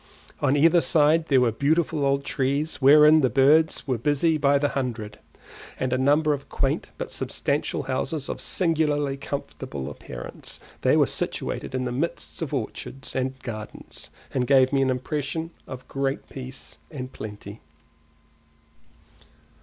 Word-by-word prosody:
On 135 +2 +3
either 165 +3 +5
side 160 +1 +3
there 135 -3 +4
were 120 -2 +3
beautiful 150 +5 +1
old 140 0 +2
trees 140 +3 -1
wherein 150 +3 +7
the 130 - +3
birds 150 +5 +4
were 130 -4 -1
busy 150 +5 +2
by 140 -2 +3
the 145 0 +1
hundred, 120 -6 -4 0.6
and 130 -1 0
a - - +3
number 150 +3 +3
of 140 -1 -6
quaint - - -1
but - - -5
substantial - - -1
houses 140 +2 -2
of - - -5
singularly 150 -5 +1
comfortable 105 - -5
appearance; - - -8 0.2
they - - +4
were - - +5
situated 130 - -3
in 130 0 -1
the 125 - -2
midst 145 +8 -3
of 160 - -3
orchards 135 +1 -5
and 130 0 -1
gardens, 110 - -8 0.2
and 125 -2 0
gave 135 -1 +5
me 135 - +3
an 135 - +2
impression 150 +5 -2 0.2
of 130 -1 -9
great 135 0 -2
peace 130 0 -8
and 130 -4 -7
plenty. 105 0 -8
140 Hz, 145 wpm, -25 LUFS, 130-150 Hz, 0.6 s, wherein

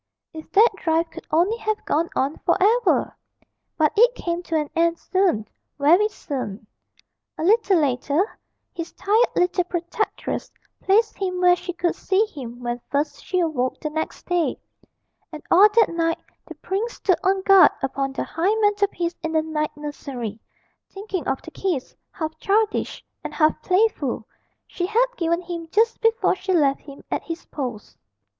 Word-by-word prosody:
If 315 -1 -10
that 445 +4 +7
drive 325 0 0
could 330 - -11
only 360 +8 +2
have 435 -2 -3
gone 330 +3 0
on 275 +3 0
for - - +1
ever! 440 +2 +2 0.6
but 305 -2 +3
it 485 +3 +5
came 345 -4 -3
to 340 -2 -4
an 305 -1 +1
end 335 0 +2
soon, 355 - 0 0.3
very 335 +9 +5
soon. 250 - -6 0.7
A - - -3
little 400 0 +4
later 285 +3 +1 0.5
his 335 0 -6
tired 440 +5 +2
little 360 0 +2
protectress 345 +4 -3 0.3
placed 425 +3 +2
him 365 -2 -2
where 360 0 +5
she 360 0 -6
could 345 0 -1
see 390 +3 +1
him 250 - -9
when 240 0 -3
first 285 +2 -2
she 365 -1 0
awoke 270 -7 -1
the 305 - -4
next 315 +1 -4
day, 355 -2 0 0.7
and 310 -2 -9
all 395 +5 +8
that 435 -4 +3
night 330 -1 0 0.3
the - - -9
prince 425 +5 -3
stood 370 -3 +1
on 380 0 +1
guard 390 -1 +8
upon 270 0 -1
the - - -2
high 365 +7 0
mantelpiece 405 -5 +1
in 320 0 -3
the 315 -1 +2
night 305 -1 -3
nursery, 260 -7 -6 0.5
thinking 390 -2 -5
of - - -1
the - - -10
kiss, 345 -9 -3 0.2
half 315 -3 -4
childish 425 +3 0 0.2
and - - -6
half 310 -1 +4
playful, 365 - +1 0.4
she 355 - -3
had 455 +5 +3
given 340 -2 0
him 340 -1 -6
just 455 +5 +2
before 455 +1 +3
she 375 0 -2
left 280 -5 +2
him 280 -1 -12
at - - 0
his 330 0 -7
post. 245 -7 -6
345 Hz, 165 wpm, -23 LUFS, 305-395 Hz, 0.7 s, all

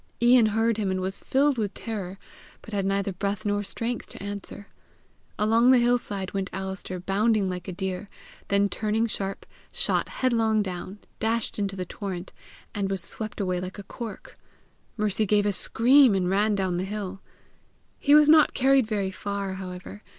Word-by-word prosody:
Ian 240 -1 +6
heard 225 +1 +1
him, 205 -3 -1
and 190 0 -1
was 190 +1 -1
filled 275 -1 +2
with 210 -2 -2
terror, 195 -5 -5 0.5
but 220 - -11
had 195 -1 0
neither 195 0 0
breath 200 +3 -3
nor 205 0 +1
strength 230 +4 -4
to - - -10
answer. 200 0 -6 0.7
Along 225 +3 +4
the 260 - +7
hillside 235 -6 0
went 195 -1 -2
Alister 190 -1 -5
bounding 200 +2 +1
like 180 0 -6
a - - -3
deer, 190 +1 -4 0.4
then 200 0 +3
turning 215 +2 0
sharp, 195 -3 -3 0.3
shot - - +1
headlong 225 -4 +1
down, 185 +1 -6 0.2
dashed 225 0 -1
into 200 -1 -1
the 185 -1 -4
torrent 185 -1 -6 0.4
and 200 -1 -1
was 195 -1 -2
swept 220 -1 -6
away 185 -3 0
like 185 +2 -6
a 200 - -7
cork. 225 +3 -8 0.6
Mercy 210 0 0
gave 205 +1 +3
a 205 - +1
scream, 250 +3 +5
and 185 -1 0
ran 205 +2 +2
down 190 -3 0
the 180 - -1
hill. 195 -1 -5 0.8
He 290 +1 +5
was 300 -1 +7
not 310 0 +6
carried 265 -2 +4
very 200 -3 -1
far, 200 0 -4
however. 190 +2 -8
205 Hz, 170 wpm, -26 LUFS, 190-225 Hz, 0.8 s, the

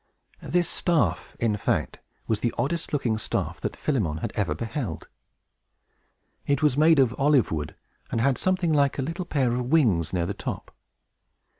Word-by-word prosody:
This 175 -1 +1
staff, 170 -2 0
in 110 -3 +1
fact, - - -1 0.3
was 110 -2 0
the 120 - 0
oddest 165 +4 -2
looking 120 -7 0
staff - - -3
that - - -3
Philemon 105 - -1
had - - -4
ever 75 - -1
beheld. 115 - -4 1.4
It 140 +1 +1
was 150 -4 +4
made 155 +2 +5
of 130 -4 +4
olive 140 -4 +3
wood, 75 -1 -3 0.3
and 115 - -1
had 130 +2 +2
something 185 -3 +1
like 140 -2 +2
a 135 - -1
little 165 +5 -4
pair 135 -8 +1
of 125 0 -2
wings 110 - +3
near 90 -2 0
the 100 - -3
top. - - -6
130 Hz, 165 wpm, -26 LUFS, 110-150 Hz, 1.4 s, made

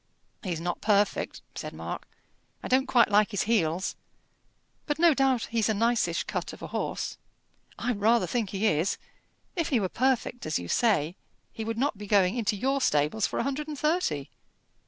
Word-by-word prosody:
"He's 175 -5 -3
not 175 +1 -3
perfect," 205 -1 +1
said - - -6
Mark. - - -6 0.6
"I - - -3
don't 265 +1 +3
quite 235 -5 +4
like 210 +1 +5
his 200 -4 0
heels; 190 -5 +1 0.9
but 295 -1 0
no 335 0 +6
doubt 265 -3 +1
he's 225 -1 +1
a 220 - +2
nicish 225 -6 +1
cut - - -4
of - - -11
a - - -4
horse." - - -3 0.6
"I 245 - -1
rather 225 +2 +3
think 230 -5 -1
he 200 +3 -1
is. 175 -1 +2 0.6
If 335 -4 0
he 255 - +3
were 190 -3 -1
perfect, 250 -3 0
as 155 - +1
you 90 - -6
say, 180 - +2 0.4
he 225 - -5
would 225 0 -3
not 260 -4 0
be 205 - -7
going 195 0 +3
into 220 -3 0
your 270 +6 0
stables 150 - +2
for - - -5
a - - +1
hundred 275 +3 -2
and 300 -1 -5
thirty. 300 - 0
220 Hz, 185 wpm, -28 LUFS, 190-255 Hz, 0.9 s, no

